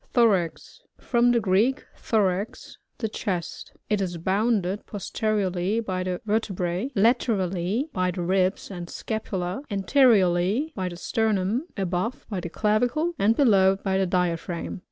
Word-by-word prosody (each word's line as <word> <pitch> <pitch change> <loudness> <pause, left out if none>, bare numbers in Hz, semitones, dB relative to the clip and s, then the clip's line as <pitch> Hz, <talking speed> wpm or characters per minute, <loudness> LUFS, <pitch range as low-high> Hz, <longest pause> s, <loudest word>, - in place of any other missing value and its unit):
Thorax. 200 -9 +1
— - - -51
From 240 0 +4
the 240 - +3
Greek, 215 +6 +1
thSrax^ 200 -2 -1 0.2
the 225 - -2
chest. 185 -5 -4
It 210 -2 0
is 175 -2 -2
bounded 195 +2 0
posteriorly 205 -1 -1
b^ 185 -5 -2
the 180 -1 -2
vertebrsB; 195 0 -1
laterally, 205 - +1
by 185 -2 +1
the 180 0 -3
ribs 185 +2 0
and 175 -2 -7
scapula; 195 -2 -3
anteriorly, 205 - +3
by 185 -2 -2
the 175 - -8
sternum; 220 - 0
above, 190 +5 -2
by 195 - -2
the 170 - -5
clavicle; 245 - +1
and 215 +3 +3
below 195 -8 +5
by 190 -1 -1
the 190 - +1
diaphragm. 175 0 -2
195 Hz, 135 wpm, -25 LUFS, 180-225 Hz, 0.2 s, below